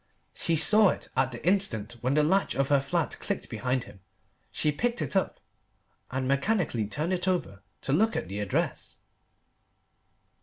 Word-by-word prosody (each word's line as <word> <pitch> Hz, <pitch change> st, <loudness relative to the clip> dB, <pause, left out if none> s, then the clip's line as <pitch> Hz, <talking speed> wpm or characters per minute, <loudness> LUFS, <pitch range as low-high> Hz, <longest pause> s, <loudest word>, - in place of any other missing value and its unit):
She 165 Hz, -, +2 dB
saw 210 Hz, +6 st, +6 dB
it -, -, -4 dB
at 130 Hz, 0 st, +1 dB
the 120 Hz, -, -8 dB
instant 120 Hz, -, +1 dB
when 130 Hz, +3 st, 0 dB
the 150 Hz, -, +4 dB
latch 190 Hz, +6 st, +1 dB
of 135 Hz, 0 st, 0 dB
her 140 Hz, -1 st, +4 dB
flat 135 Hz, -, -2 dB
clicked -, -, -4 dB
behind 130 Hz, -1 st, -1 dB
him. 100 Hz, -, -14 dB, 0.5 s
She 150 Hz, -, +1 dB
picked 235 Hz, +10 st, -1 dB
it -, -, -3 dB
up, 190 Hz, -, 0 dB, 0.7 s
and 130 Hz, 0 st, -2 dB
mechanically 140 Hz, -, 0 dB
turned 155 Hz, -, -2 dB
it 180 Hz, 0 st, -2 dB
over 175 Hz, -, -1 dB, 0.2 s
to 135 Hz, -, -2 dB
look 220 Hz, +8 st, +2 dB
at -, -, -3 dB
the 100 Hz, +3 st, -5 dB
address. 105 Hz, -2 st, -2 dB
145 Hz, 165 wpm, -28 LUFS, 125-185 Hz, 0.7 s, saw